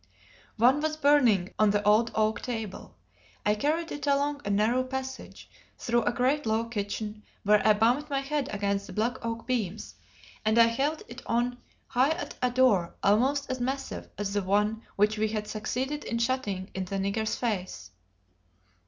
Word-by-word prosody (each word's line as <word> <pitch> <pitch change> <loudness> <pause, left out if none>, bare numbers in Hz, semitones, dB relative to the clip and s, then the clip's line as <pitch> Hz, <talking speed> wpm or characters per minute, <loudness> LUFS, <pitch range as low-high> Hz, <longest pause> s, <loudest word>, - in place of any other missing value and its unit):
One 255 +6 +4
was 310 0 -1
burning 250 -11 +3
on 215 -1 +5
the 205 0 +1
old 220 +3 +5
oak 215 0 +1
table. 225 -6 -6 0.5
I 210 - +4
carried 310 +9 -1
it 290 0 -5
along 285 +1 +1
a - - -4
narrow 220 +5 +2
passage, 265 0 -6 0.3
through 240 0 +1
a - - +2
great 260 +3 +1
low 220 +1 +1
kitchen 210 -1 -4 0.2
where 210 0 +4
I 215 - +7
bumped 245 +8 +2
my 275 -1 0
head 280 0 -2
against 200 -1 -1
the - - -9
black 235 +4 -1
oak 230 0 -4
beams; 220 -6 -2 0.5
and 215 +1 +2
I 230 - +8
held 275 +7 -1
it 240 +2 -10
on 245 +1 0 0.3
high 260 +5 +2
at 345 - -6
a 250 - +3
door 240 -9 +3
almost 265 +8 +3
as 255 - -3
massive 265 +2 -3
as 200 -1 -3
the 205 - +1
one 210 +3 +1
which 210 +1 +2
we 220 - +2
had 210 -1 -3
succeeded 260 +7 -3
in 230 - -2
shutting 230 -6 -1
in 190 0 -3
the 195 - -5
nigger's 200 +3 -1
face. 185 - -3
230 Hz, 175 wpm, -28 LUFS, 210-265 Hz, 0.5 s, I